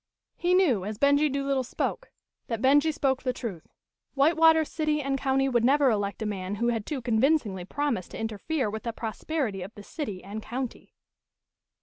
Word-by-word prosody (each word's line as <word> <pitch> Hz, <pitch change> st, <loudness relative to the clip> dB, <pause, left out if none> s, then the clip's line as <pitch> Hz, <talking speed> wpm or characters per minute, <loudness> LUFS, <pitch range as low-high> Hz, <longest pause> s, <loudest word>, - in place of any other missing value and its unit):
He 355 Hz, +1 st, +2 dB
knew, 280 Hz, -, +3 dB
as 210 Hz, +2 st, -4 dB
Benjie 285 Hz, +3 st, +3 dB
Doolittle 275 Hz, -1 st, 0 dB
spoke, -, -, -3 dB, 0.4 s
that 230 Hz, -2 st, -2 dB
Benjie 285 Hz, +5 st, +4 dB
spoke 270 Hz, -3 st, 0 dB
the 255 Hz, -, 0 dB
truth 210 Hz, -10 st, -6 dB, 0.5 s
White 290 Hz, +4 st, +4 dB
water 320 Hz, 0 st, +5 dB
city 305 Hz, -1 st, -1 dB
and 275 Hz, -1 st, -1 dB
county 270 Hz, 0 st, +1 dB
would 240 Hz, -3 st, +2 dB
never 275 Hz, +1 st, +4 dB
elect 205 Hz, 0 st, -2 dB
a -, -, -3 dB
man 195 Hz, -1 st, -3 dB
who 235 Hz, +3 st, 0 dB
had 225 Hz, -3 st, -2 dB
too 275 Hz, -5 st, -3 dB
convincingly 225 Hz, -, +1 dB
promised 275 Hz, -5 st, -2 dB
to -, -, -8 dB
interfere 225 Hz, +5 st, -2 dB
with 215 Hz, +1 st, -4 dB
the 230 Hz, -, -4 dB
prosperity 225 Hz, -, -3 dB
of 190 Hz, +5 st, -8 dB
the 205 Hz, -, -10 dB
city 210 Hz, -, -6 dB
and 205 Hz, +3 st, -6 dB
county. 250 Hz, +2 st, -6 dB
255 Hz, 185 wpm, -27 LUFS, 215-290 Hz, 0.5 s, water